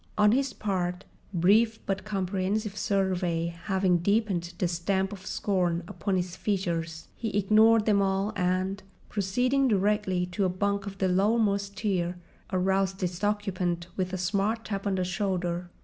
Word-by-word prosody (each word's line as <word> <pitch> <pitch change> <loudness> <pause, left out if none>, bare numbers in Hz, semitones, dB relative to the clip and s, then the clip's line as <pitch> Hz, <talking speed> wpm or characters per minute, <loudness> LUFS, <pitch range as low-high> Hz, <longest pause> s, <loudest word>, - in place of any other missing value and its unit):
On 210 0 +5
his 270 +3 +1
part, 180 -3 -2 0.3
brief 210 +6 +3
but 195 0 -2
comprehensive 200 +1 -1
survey 185 -5 0 0.2
having 190 -3 +2
deepened 185 -3 0
the 180 - +1
stamp 190 +3 -1
of 195 0 -10
scorn 180 -4 0
upon 200 0 -2
his 180 -1 -2
features, 170 -5 -2
he 225 - -3
ignored 215 +2 +5
them 205 -2 +3
all 195 +2 0
and, 185 +1 0 0.3
proceeding 250 +7 +1
directly 200 -3 +1
to 180 +2 -2
a 185 - +2
bunk 200 +2 -1
of 195 0 -7
the 190 - +1
lowermost 200 +1 +1
tier, 185 -4 -1 0.3
aroused 190 +1 +1
its 180 +1 -3
occupant 185 -5 -1
with 185 -1 -2
a 185 - -2
smart 200 +5 0
tap 200 -1 -3
on 195 - +1
the 185 - 0
shoulder. 180 -2 -2
195 Hz, 150 wpm, -28 LUFS, 180-205 Hz, 0.3 s, On